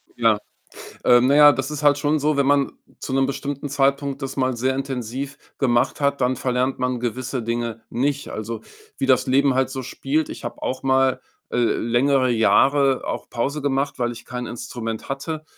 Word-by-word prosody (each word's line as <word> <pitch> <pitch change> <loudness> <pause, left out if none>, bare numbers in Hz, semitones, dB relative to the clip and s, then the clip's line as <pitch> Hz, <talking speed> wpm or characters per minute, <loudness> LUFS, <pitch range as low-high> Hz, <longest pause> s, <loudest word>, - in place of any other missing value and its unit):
Ja. 115 -3 +3 0.7
Äh, 120 -1 +6
naja, 145 +3 +7
das 135 -1 -3
ist 150 0 -5
halt 145 -1 +4
schon 150 +1 +1
so, 150 +1 +1
wenn 140 -1 +2
man 140 -1 +2 0.3
zu 130 - -6
'nem 135 0 +3
bestimmten 140 +1 -4
Zeitpunkt 140 0 0
das 135 0 -4
mal 130 -2 0
sehr 130 +3 0
intensiv 135 +1 -4 0.2
gemacht 120 -1 +1
hat, 140 -1 +1
dann 125 0 +1
verlernt 125 +1 -1
man 125 -1 -1
gewisse 125 +1 -3
Dinge 115 0 -3
nicht. 140 +3 -1
Also, 110 +1 -5 0.4
wie 135 - 0
das 130 -1 +3
Leben 135 +1 +3
halt 130 0 +1
so 130 -1 -4
spielt, 140 +5 -2
ich - - -8
habe - - -6
auch 130 - -3
mal, 130 0 +2 0.3
äh, - - -2
längere 125 +3 +2
Jahre 135 +4 +3
auch - - -4
Pause 140 +5 -2
gemacht, 140 0 -1
weil 120 -1 0
ich 120 - -11
kein 125 0 -5
Instrument 115 -1 -6
hatte. 155 +3 -4
130 Hz, 185 wpm, -22 LUFS, 125-140 Hz, 0.7 s, naja